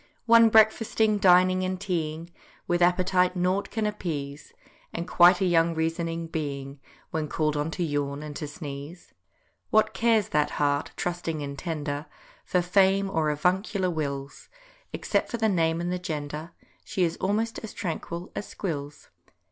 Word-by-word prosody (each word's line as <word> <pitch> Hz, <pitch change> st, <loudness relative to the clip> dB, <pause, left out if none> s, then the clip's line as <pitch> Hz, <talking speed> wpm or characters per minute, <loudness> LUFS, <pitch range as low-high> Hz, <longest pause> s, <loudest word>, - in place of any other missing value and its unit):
One 230 Hz, -1 st, +7 dB
breakfasting, 220 Hz, -1 st, +3 dB
dining, 185 Hz, -1 st, +5 dB
and 185 Hz, 0 st, -2 dB
teaing, 170 Hz, -3 st, -3 dB, 0.4 s
With 175 Hz, 0 st, +1 dB
appetite 180 Hz, +1 st, +3 dB
nought 185 Hz, +2 st, 0 dB
can 220 Hz, -1 st, -2 dB
appease, 155 Hz, -9 st, -4 dB, 0.4 s
And 170 Hz, +1 st, -4 dB
quite 180 Hz, +1 st, +6 dB
a -, -, +3 dB
young 165 Hz, -1 st, +3 dB
Reasoning 165 Hz, +1 st, -2 dB
Being 140 Hz, -4 st, -5 dB, 0.3 s
When 155 Hz, -1 st, -2 dB
called 150 Hz, 0 st, 0 dB
on 150 Hz, +2 st, -1 dB
to 175 Hz, +2 st, -3 dB
yawn 145 Hz, -2 st, -2 dB
and 150 Hz, -1 st, -7 dB
to 150 Hz, -, -5 dB
sneeze. 145 Hz, +2 st, -9 dB, 0.6 s
What 215 Hz, 0 st, +3 dB
cares 225 Hz, 0 st, +2 dB
that 150 Hz, 0 st, +1 dB
heart, 145 Hz, 0 st, +1 dB
trusting 170 Hz, -3 st, -3 dB
and 140 Hz, 0 st, -5 dB
tender, 145 Hz, -2 st, -4 dB, 0.4 s
For 180 Hz, -1 st, +1 dB
fame 195 Hz, +2 st, +3 dB
or 160 Hz, -4 st, +1 dB
avuncular 185 Hz, +5 st, 0 dB
wills; 140 Hz, -3 st, -5 dB, 0.4 s
Except -, -, -1 dB
for 235 Hz, -, -3 dB
the 220 Hz, -1 st, +2 dB
name 165 Hz, -4 st, +1 dB
and 175 Hz, +1 st, -2 dB
the 180 Hz, -, -2 dB
gender, 155 Hz, -2 st, -5 dB, 0.3 s
She 185 Hz, -, -1 dB
is 165 Hz, -1 st, 0 dB
almost 215 Hz, +4 st, -1 dB
as 220 Hz, -, -8 dB
tranquil 170 Hz, -1 st, -5 dB
as 205 Hz, -, -4 dB
Squills. 145 Hz, -6 st, -6 dB
170 Hz, 155 wpm, -26 LUFS, 150-190 Hz, 0.6 s, One